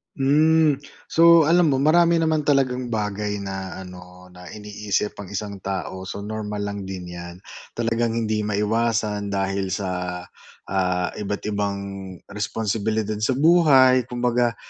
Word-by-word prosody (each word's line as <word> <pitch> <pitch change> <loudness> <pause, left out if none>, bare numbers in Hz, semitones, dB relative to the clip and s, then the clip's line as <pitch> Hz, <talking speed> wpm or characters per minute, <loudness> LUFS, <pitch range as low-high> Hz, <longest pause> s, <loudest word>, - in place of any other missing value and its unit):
Hmm. 150 +1 +3 0.3
So, 170 0 +7
alam 170 +2 +4
mo 140 - +2
marami 170 +5 +4
naman 160 -2 +1
talagang 130 -3 +1
bagay 105 -2 -2
na 95 -1 -5
ano, 90 0 -13
na 90 0 -13
iniisip 105 0 -3
ang 100 - -7
isang 100 0 -5
tao. 95 -1 -5
So, 100 - -6
normal 105 -1 -4
lang 100 -1 -5
din 90 -2 -7
'yan. 85 +2 -9 0.3
Talagang 115 0 0
hindi 110 -2 0
maiwasan 105 0 0
dahil 95 -1 -1
sa, 90 -2 -4 0.5
ah, 90 -2 0
iba't 105 0 -4
ibang 100 -1 -1 0.5
responsibilidad 110 0 -2
sa 125 +4 +1
buhay 135 -6 +5
kumbaga 120 -1 0
105 Hz, 130 wpm, -23 LUFS, 95-125 Hz, 0.5 s, So